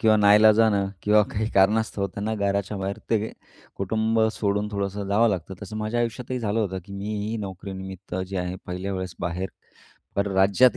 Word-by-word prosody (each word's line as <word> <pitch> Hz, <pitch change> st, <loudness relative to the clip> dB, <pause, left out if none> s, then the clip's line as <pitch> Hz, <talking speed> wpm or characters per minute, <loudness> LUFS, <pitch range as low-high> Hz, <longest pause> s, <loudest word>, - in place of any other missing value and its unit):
किंवा 110 Hz, -1 st, +5 dB
नाइलाजाने 105 Hz, +1 st, +6 dB, 0.3 s
किंवा 105 Hz, +1 st, +5 dB
काही 110 Hz, +1 st, -1 dB
कारणास्तव 100 Hz, +1 st, +3 dB
त्यांना 100 Hz, +3 st, -3 dB
घराच्या 100 Hz, 0 st, -1 dB
बाहेर 95 Hz, +1 st, -3 dB
ते 110 Hz, -1 st, +1 dB, 0.4 s
कुटुंब 110 Hz, +3 st, +1 dB
सोडून 105 Hz, -1 st, 0 dB
थोडंसं 100 Hz, 0 st, -2 dB
जावं 110 Hz, +4 st, +4 dB
लागतं. 95 Hz, -2 st, -2 dB
तसं 110 Hz, -, -6 dB
माझ्या 110 Hz, +2 st, -1 dB
आयुष्यातही 125 Hz, +2 st, -2 dB
झालं 110 Hz, -1 st, 0 dB
होतं 95 Hz, -3 st, -1 dB
की 100 Hz, -, -11 dB
मीही 105 Hz, +2 st, -3 dB
नोकरीनिमित्त 95 Hz, -2 st, -7 dB
जे 95 Hz, -, -4 dB
आहे 90 Hz, +1 st, -3 dB
पहिल्या 90 Hz, +2 st, -3 dB
वेळेस 95 Hz, -2 st, -4 dB
बाहेर 90 Hz, +2 st, -2 dB, 0.7 s
परराज्यात 100 Hz, +4 st, +4 dB
100 Hz, 155 wpm, -25 LUFS, 95-110 Hz, 0.7 s, नाइलाजाने